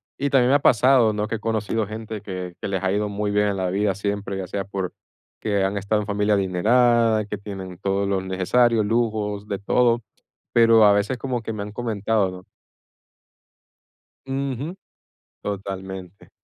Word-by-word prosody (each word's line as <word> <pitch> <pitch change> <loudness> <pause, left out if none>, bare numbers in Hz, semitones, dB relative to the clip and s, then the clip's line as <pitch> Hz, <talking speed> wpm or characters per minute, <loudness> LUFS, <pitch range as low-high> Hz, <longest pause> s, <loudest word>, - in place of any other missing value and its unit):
Y 140 +1 -1
también 130 -2 +4
me 140 - +5
ha - - +5
pasado, 125 -2 +5
¿no? 105 0 -2
Que 115 - -2
he - - -5
conocido 110 -1 -1
gente 110 -1 -6
que 90 -3 -6
que - - -3
les 95 -1 -2
ha 95 - +1
ido 105 +1 0
muy 105 0 -2
bien 105 0 +2
en 100 -1 -1
la 95 -1 -1
vida 100 -1 +1
siempre, 100 -1 -3
ya 95 - -4
sea 100 +1 -3
porque 95 -2 -4 0.4
que 100 -3 0
han 95 +1 0
estado 105 +2 0
en - - -5
familia 105 0 +1
adinerada, 110 +4 +3
que 105 0 -5
tienen 95 -3 -8
todo 100 +1 0
lo 100 -1 0
necesario, 110 +5 +2
lujos, 105 -2 -1
de 100 - -2
todo, 120 +2 +2 0.5
pero 115 -2 +6
a 105 - +7
veces 105 +5 0
como 125 -2 -3
que 115 - -5
me 100 -1 -4
han 105 - -7
comentado, 110 -3 0
¿no? 90 0 -11 1.8
Ujú, 135 +4 -3 0.7
totalmente. 95 -2 -6
105 Hz, 180 wpm, -23 LUFS, 100-115 Hz, 1.8 s, a